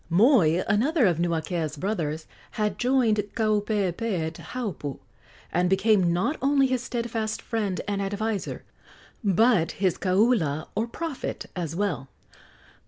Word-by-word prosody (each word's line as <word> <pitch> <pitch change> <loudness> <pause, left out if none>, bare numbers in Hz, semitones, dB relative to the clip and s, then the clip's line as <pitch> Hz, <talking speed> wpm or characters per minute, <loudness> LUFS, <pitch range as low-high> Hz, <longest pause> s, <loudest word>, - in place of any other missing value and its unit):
Moi, 185 - +4
another 250 +7 +3
of 175 -4 +2
Nuakea's 165 -2 -1
brothers, 160 -4 -2 0.3
had 210 -2 -1
joined 245 -4 +3 0.2
Kaupeepee 210 -3 0
at 160 - -4
Haupu, 190 - -5 0.6
and 180 +1 +2
became 195 -2 +3
not 180 - 0
only 275 0 +4
his 255 -2 0
steadfast 230 -3 -3
friend 210 -5 -2
and 200 -1 -1
adviser, 205 +1 -3 0.6
but 200 -3 +3
his 185 -3 0
kaula, 185 - +2
or 220 +3 -1
prophet, 320 +3 -5
as 165 -3 -3
well. 175 -9 -2
205 Hz, 120 wpm, -26 LUFS, 175-230 Hz, 0.6 s, Moi